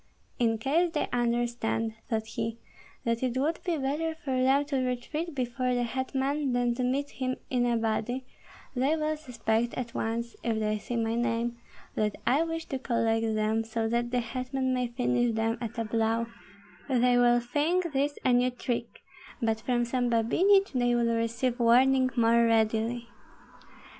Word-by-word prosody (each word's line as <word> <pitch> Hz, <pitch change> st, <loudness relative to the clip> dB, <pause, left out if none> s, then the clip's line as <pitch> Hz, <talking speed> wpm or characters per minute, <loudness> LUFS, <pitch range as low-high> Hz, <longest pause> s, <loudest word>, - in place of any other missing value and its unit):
"In 225 Hz, -2 st, +2 dB
case 310 Hz, +10 st, +2 dB
they 300 Hz, -, 0 dB
understand," 235 Hz, -2 st, 0 dB, 0.2 s
thought 220 Hz, -1 st, -1 dB
he, 225 Hz, +1 st, -4 dB, 0.5 s
"that 230 Hz, 0 st, 0 dB
it 255 Hz, -1 st, -1 dB
would 305 Hz, +5 st, 0 dB
be 345 Hz, -3 st, 0 dB
better 300 Hz, +4 st, -1 dB
for 270 Hz, -6 st, -2 dB
them 270 Hz, +2 st, +3 dB
to 280 Hz, -2 st, -1 dB
retreat 295 Hz, +6 st, -3 dB
before 250 Hz, 0 st, -1 dB
the 245 Hz, -, +1 dB
hetman 265 Hz, +3 st, -1 dB
than 245 Hz, -1 st, +2 dB
to 250 Hz, +1 st, -2 dB
meet 275 Hz, +3 st, 0 dB
him 255 Hz, -1 st, -2 dB, 0.2 s
in 245 Hz, -2 st, +2 dB
a 235 Hz, -1 st, +2 dB
body, 225 Hz, +3 st, -1 dB, 0.5 s
they 270 Hz, +5 st, +2 dB
will 310 Hz, 0 st, 0 dB
suspect 240 Hz, -5 st, -1 dB
at 240 Hz, -2 st, -4 dB
once, 235 Hz, +1 st, -2 dB
if 230 Hz, -2 st, 0 dB
they 215 Hz, -1 st, 0 dB
see 240 Hz, -, -5 dB
my 225 Hz, -1 st, 0 dB
name, 235 Hz, 0 st, -1 dB, 0.3 s
that 210 Hz, -1 st, 0 dB
I 280 Hz, +5 st, +3 dB
wish 325 Hz, 0 st, -2 dB
to 270 Hz, -, -2 dB
collect 225 Hz, -3 st, 0 dB
them, 215 Hz, +1 st, +1 dB
so 225 Hz, 0 st, -2 dB
that 240 Hz, +1 st, 0 dB
the 250 Hz, 0 st, +1 dB
hetman 255 Hz, +2 st, -2 dB
may 250 Hz, -1 st, 0 dB
finish 240 Hz, -1 st, 0 dB
them 225 Hz, +1 st, 0 dB
at 230 Hz, -1 st, -5 dB
a 230 Hz, -, -1 dB
blow; 225 Hz, +1 st, +1 dB, 0.6 s
they 245 Hz, -1 st, +4 dB
will 240 Hz, 0 st, +5 dB
think 305 Hz, +8 st, 0 dB
this 285 Hz, +2 st, 0 dB
a 255 Hz, -, +4 dB
new 245 Hz, +1 st, +4 dB
trick, 240 Hz, -1 st, -4 dB, 0.4 s
but 225 Hz, -3 st, 0 dB
from 240 Hz, 0 st, +1 dB
some 245 Hz, 0 st, 0 dB
Babinich 370 Hz, -, +3 dB
they 245 Hz, -2 st, +2 dB
will 235 Hz, -1 st, +2 dB
receive 230 Hz, +2 st, -1 dB
warning 255 Hz, +2 st, +5 dB
more 235 Hz, 0 st, +4 dB
readily." 225 Hz, +1 st, +1 dB
245 Hz, 170 wpm, -28 LUFS, 230-265 Hz, 0.6 s, will